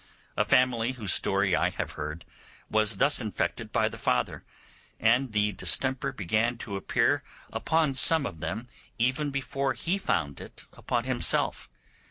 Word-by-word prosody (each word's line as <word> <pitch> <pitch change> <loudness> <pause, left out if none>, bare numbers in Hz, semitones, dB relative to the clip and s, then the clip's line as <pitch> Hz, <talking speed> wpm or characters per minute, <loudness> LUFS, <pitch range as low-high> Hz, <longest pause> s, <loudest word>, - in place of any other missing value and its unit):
A - - +2
family, 125 -1 +2
whose 110 -7 +2
story 95 -2 +2
I - - +2
have - - -5
heard, 75 +2 -6 0.5
was 110 -1 +2
thus 140 +3 +4
infected 105 -4 -3
by - - +2
the - - -7
father; 60 0 -1 0.6
and 125 +3 +2
the 105 0 +1
distemper 130 +8 +1
began 110 +5 -1
to 105 -3 -5
appear 95 - +1 0.3
upon 160 -3 +1
some 145 +3 +4
of 80 - -6
them 110 +9 -4 0.3
even 130 +6 0
before 140 -1 -2
he 180 +8 -2
found 75 - -2
it - - -12
upon 120 -1 -2
himself. 130 -1 0
115 Hz, 150 wpm, -27 LUFS, 100-130 Hz, 0.6 s, thus